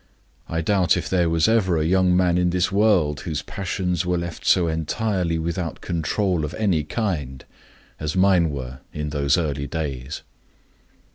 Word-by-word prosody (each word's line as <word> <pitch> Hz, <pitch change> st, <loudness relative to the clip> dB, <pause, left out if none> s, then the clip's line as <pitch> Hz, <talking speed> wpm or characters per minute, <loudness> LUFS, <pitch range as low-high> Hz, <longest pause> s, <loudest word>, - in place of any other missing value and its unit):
I 80 Hz, 0 st, -1 dB
doubt 95 Hz, +1 st, +2 dB
if -, -, -3 dB
there 90 Hz, -3 st, +2 dB
was 80 Hz, +2 st, +2 dB
ever 100 Hz, -7 st, +2 dB
a 80 Hz, -, 0 dB
young 90 Hz, +1 st, +3 dB
man 90 Hz, -2 st, +3 dB
in 90 Hz, 0 st, +2 dB
this 90 Hz, +1 st, 0 dB
world 95 Hz, -8 st, +3 dB
whose 80 Hz, -5 st, -4 dB
passions 90 Hz, -2 st, -2 dB
were 90 Hz, 0 st, 0 dB
left 85 Hz, -1 st, -5 dB
so 90 Hz, -2 st, +4 dB
entirely 85 Hz, +2 st, -1 dB
without 85 Hz, 0 st, -3 dB
control 85 Hz, +1 st, -1 dB
of 75 Hz, -, -4 dB
any 95 Hz, -8 st, +1 dB
kind 75 Hz, -, -3 dB, 0.5 s
as 75 Hz, 0 st, -3 dB
mine 95 Hz, -3 st, +4 dB
were 65 Hz, -2 st, -6 dB
in 75 Hz, 0 st, -4 dB
those 70 Hz, 0 st, +1 dB
early 70 Hz, -4 st, -2 dB
days. 70 Hz, -4 st, -4 dB
85 Hz, 160 wpm, -23 LUFS, 75-95 Hz, 0.5 s, so